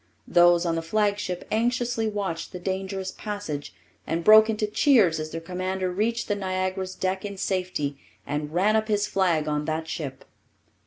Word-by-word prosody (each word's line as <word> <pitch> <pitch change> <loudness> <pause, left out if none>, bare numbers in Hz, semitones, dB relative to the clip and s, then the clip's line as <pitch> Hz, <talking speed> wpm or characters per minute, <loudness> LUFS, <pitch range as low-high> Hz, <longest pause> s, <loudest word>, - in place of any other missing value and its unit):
Those 175 0 +5
on 170 - +1
the 165 - -1
flagship 205 0 -1
anxiously 235 0 0
watched 195 -6 -3
the 180 - -5
dangerous 190 +1 -3
passage, 205 -9 -5 0.4
and 165 +1 -1
broke 215 +3 +8
into 215 -1 0
cheers 210 - +4
as 155 0 -4
their 165 - -5
commander 185 +2 -3
reached 225 +5 -1
the 205 - +1
Niagara's 185 -1 -2
deck 190 0 -2
in 200 -1 -6
safety 180 -8 -2 0.3
and 150 +1 -3
ran 195 +6 +2
up 220 0 +1
his 205 -1 +1
flag 170 -7 +1
on 150 0 -1
that 160 +1 -2
ship. 135 -5 -5
185 Hz, 165 wpm, -25 LUFS, 165-210 Hz, 0.4 s, broke